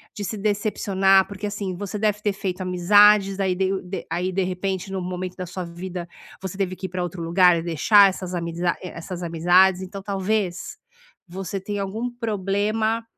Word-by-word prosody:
de 205 - -5
se 205 +3 -4
decepcionar. 195 -2 +2
Porque 200 +1 -5
assim, 200 -3 -4
você 205 +2 -5
deve 210 0 0
ter 205 -1 0
feito 190 -1 -4
amizades, 195 +2 +5
aí 190 -2 +1
de 190 +1 0
de 185 +2 -6
aí, 180 +3 -1
de 190 +1 0
repente, 185 +1 -3
num 190 -1 -3
momento 180 0 -5
da 185 - -4
sua 185 +2 -5
vida, 175 +1 -6 0.3
você 190 -1 -6
teve 190 -2 -1
que 190 - -7
ir - - -14
pra 180 +1 -3
outro 175 -1 -5
lugar 175 +1 +5
e 165 - -3
deixar 195 +5 +5
essas 185 -1 -5
amizad 170 +1 -1
é, 180 - -6
essas 175 +1 -6
amizades. 180 +3 +4
Então 195 +1 -7
talvez 195 -2 -2 0.5
você 190 +2 -5
tenha 205 +1 -4
algum 220 +6 -3
problema, 215 0 -1
190 Hz, 185 wpm, -23 LUFS, 180-200 Hz, 0.5 s, amizades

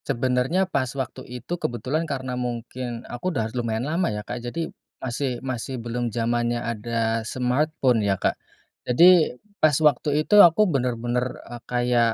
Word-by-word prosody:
Sebenernya, 130 +9 +1
pas 140 -9 -1
waktu 130 -4 -4
itu 125 +6 -6
kebetulan 145 +7 -2
karena 130 -2 -3
mungkin, 120 0 -4
aku 120 +10 -4
udah 115 -9 -2
lumayan 115 -1 -2
lama 165 +4 0
ya, 105 0 -4
Kak. 125 0 -5
Jadi, 125 +8 -3 0.4
masih 130 0 -2
masih 130 0 -4
belum 120 +1 -3
zamannya 120 +1 0
ada 115 -1 -1
smartphone, 125 +1 +1
ya, 100 -2 +1
Kak. - - +1 0.6
Jadi, 165 +1 +6 0.2
pas 155 -3 +5
waktu 150 0 +2
itu, 210 -1 +7
aku 175 +5 +6
bener-bener, 125 - -1
eee, 120 -1 -9
kayak, 120 -2 +2
125 Hz, 150 wpm, -24 LUFS, 120-140 Hz, 0.6 s, itu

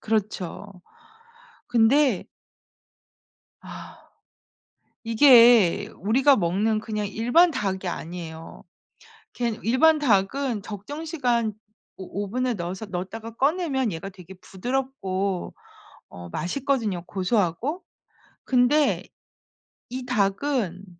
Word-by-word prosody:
그렇죠. 210 -3 -2 1.0
근데 245 0 +3 1.4
아 - - -12 1.0
이게 230 -5 +6
우리가 260 +8 +3
먹는 205 +5 0
그냥 215 -1 -3
일반 245 - +3
닭이 195 - -3
아니에요. 165 -1 -7 0.7
걔는 235 -3 -2
일반 305 +7 +4
닭은 235 0 +1
적정 255 +10 -7
시간 245 -9 0 0.4
오 195 +2 -5
오븐에 250 +5 -1
넣어서 185 +2 -5
넣었다가 215 +4 -6
꺼내면 275 - 0
얘가 165 +4 -6
되게 185 -1 -13
부드럽고 195 -3 -3 0.6
어 85 0 -10
맛있거든요 210 - -2
고소하고. 205 - -1 0.6
근데 265 +4 +2 0.8
이 255 +1 -6
닭은 200 - -1
220 Hz, 200 characters per minute, -24 LUFS, 190-260 Hz, 1.4 s, 이게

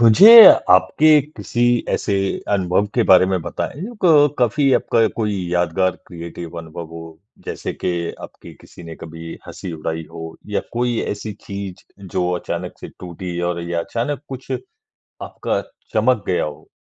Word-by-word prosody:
मुझे, 115 - +8 0.4
आपके 150 +12 +5 0.2
किसी 120 - -3 0.3
ऐसे 100 - -1 0.4
अनुभव 95 0 +1
के 120 - +3
बारे 95 0 +7
में 95 -2 -1
बताएँ 145 - -5 0.2
क 150 -4 +5
काफ़ी 135 +3 +2
आपका 115 -1 +2
कोई 105 -3 -1 0.2
यादगार 90 +1 0
क्रिएटिव 85 -1 -8
अनुभव 85 +1 -8
हो 85 - -7 0.4
जैसे - - -5
के 90 - +1 0.3
आपकी - - -13
किसी - - -15
ने 85 -1 -9
कभी 80 0 -9
हँसी 90 - -8
उड़ाई 80 0 -4
हो 80 -1 -8
या 105 - -1
कोई 120 -1 -1
ऐसी 105 +1 -5
चीज़ 100 -2 -7 0.2
जो 90 -1 -2
अचानक 90 0 -6
से - - -8
टूटी 90 0 -7
और 85 -1 -4
या 85 - -1
अचानक 125 +9 -3
कुछ 130 0 -9 0.7
आपका - - -3 0.3
चमक 110 0 +2
गया 90 - +1
हो? 75 -1 -9
95 Hz, 150 wpm, -19 LUFS, 85-115 Hz, 0.7 s, मुझे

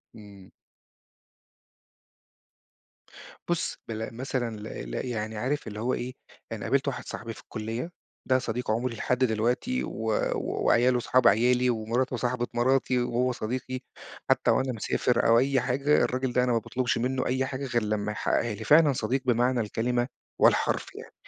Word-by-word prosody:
إمم. 100 -3 -13 3.0
بُصّ، 175 -1 -1
بل 110 0 -5
مثلًا 125 -3 -2
ل 105 - -9 0.3
ل - - -3
يعني 110 -3 -3
عارف 130 +2 -2
اللي 105 0 -6
هو 125 +3 0
إيه، 125 +1 -3 0.4
أنا 110 -3 -5
قابلت 140 +1 +1
واحد 125 -2 -3
صاحبي 115 0 -6
في - - -13
الكُلّية، 115 +9 -5 0.4
ده 130 0 +4
صديق 120 -1 -2
عمري 115 +2 -1
لحد 125 +2 0
دلوقتي 120 - 0
و 110 0 -3 0.2
وعياله 125 +1 +2
اصحاب 125 +1 +3
عيالي 125 +4 +4
ومراته 120 +3 0
صاحبة 120 0 -1
مراتي 125 +1 +2
وهو 125 +1 +1
صديقي، 130 +2 -4 0.5
حتى - - +3
وأنا 130 0 +1
مسافر 115 +2 +1
أو 115 0 +6
أي 135 +1 +2
حاجة، 140 +4 +2
الراجل 130 0 -1
ده 125 - +3
أنا 125 - +1
ما 115 - +3
باطلُبش 125 +3 -1
مِنُّه 130 +2 -1
أي 130 +1 0
حاجة 135 +1 -4
غير 120 -3 0
لما 105 0 -1
يحقّقها 115 +1 0
لي. - - -7
فعلًا 150 -2 +6
صديق 125 +3 -1
بمعنى 125 0 +2
الكلمة 120 +3 -1 0.3
والحرف - - +3
يعني - - -10
125 Hz, 155 wpm, -27 LUFS, 115-130 Hz, 3.0 s, أو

